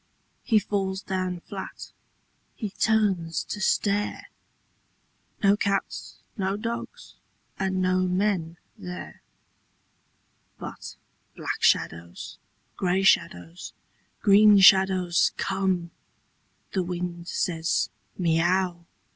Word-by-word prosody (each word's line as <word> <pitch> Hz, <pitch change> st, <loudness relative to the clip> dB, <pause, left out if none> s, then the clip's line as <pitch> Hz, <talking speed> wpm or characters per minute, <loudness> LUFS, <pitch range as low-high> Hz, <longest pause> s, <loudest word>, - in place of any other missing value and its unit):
He 225 Hz, -, +3 dB
falls 195 Hz, -2 st, -1 dB
down 185 Hz, -2 st, -3 dB
flat. 195 Hz, +1 st, -8 dB, 0.7 s
H)e 215 Hz, -4 st, -4 dB
turns 195 Hz, -7 st, +1 dB
to 210 Hz, -, -6 dB
stare 205 Hz, +1 st, 0 dB, 0.6 s
— -, -, -33 dB
No 200 Hz, 0 st, +5 dB
cats, 200 Hz, -1 st, -2 dB, 0.2 s
no 195 Hz, -2 st, -1 dB
dogs, 235 Hz, -, -6 dB, 0.5 s
and 190 Hz, -1 st, 0 dB
no 185 Hz, 0 st, +2 dB
men 180 Hz, -3 st, 0 dB, 0.2 s
there. 180 Hz, 0 st, -8 dB, 1.4 s
But -, -, -8 dB, 0.4 s
black -, -, -4 dB
shadows, 85 Hz, +1 st, 0 dB, 0.4 s
grey 185 Hz, +1 st, +1 dB
shadows, 90 Hz, -, +1 dB, 0.5 s
green 205 Hz, +1 st, +7 dB
shadows 190 Hz, -2 st, +5 dB
come. 190 Hz, -3 st, -1 dB, 0.8 s
The 190 Hz, -, 0 dB
wind 175 Hz, -1 st, -4 dB
says, 165 Hz, -3 st, -1 dB
" -, -, -39 dB
Miau! 175 Hz, +1 st, +1 dB
190 Hz, 95 wpm, -26 LUFS, 175-200 Hz, 1.4 s, green